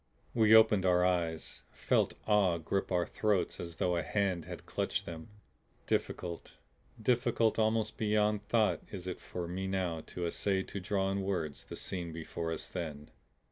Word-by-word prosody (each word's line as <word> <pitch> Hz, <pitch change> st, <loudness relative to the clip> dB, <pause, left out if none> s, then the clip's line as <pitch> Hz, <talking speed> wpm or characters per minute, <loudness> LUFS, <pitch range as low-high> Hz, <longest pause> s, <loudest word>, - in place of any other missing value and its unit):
We 110 Hz, -1 st, +6 dB
opened 110 Hz, -3 st, +6 dB
our 90 Hz, -1 st, +4 dB
eyes, 85 Hz, -3 st, -1 dB
felt -, -, +1 dB
awe 100 Hz, -5 st, +3 dB
grip 95 Hz, +5 st, -2 dB
our 90 Hz, -1 st, +2 dB
throats 105 Hz, -1 st, 0 dB
as 85 Hz, -1 st, -6 dB
though 90 Hz, +2 st, +1 dB
a -, -, +1 dB
hand 95 Hz, -2 st, 0 dB
had -, -, -8 dB
clutched -, -, -2 dB
them. 80 Hz, +1 st, -8 dB, 0.6 s
Difficult, 85 Hz, -1 st, -2 dB, 0.4 s
difficult 115 Hz, -1 st, +2 dB
almost 110 Hz, 0 st, +1 dB
beyond 105 Hz, -1 st, +2 dB
thought 110 Hz, 0 st, +2 dB
is 95 Hz, -3 st, -6 dB
it 90 Hz, -1 st, -4 dB
for 90 Hz, -1 st, -5 dB
me 95 Hz, +2 st, -3 dB
now 90 Hz, -4 st, -1 dB
to 90 Hz, -, -4 dB
essay 95 Hz, +3 st, 0 dB
to 100 Hz, -, -6 dB
draw 95 Hz, +1 st, 0 dB
in 100 Hz, 0 st, -1 dB
words 90 Hz, -6 st, -2 dB
the -, -, -8 dB
scene 85 Hz, -3 st, -3 dB
before 80 Hz, 0 st, -4 dB
us 80 Hz, -, -4 dB
then. 75 Hz, -5 st, -6 dB
95 Hz, 165 wpm, -32 LUFS, 85-105 Hz, 0.6 s, We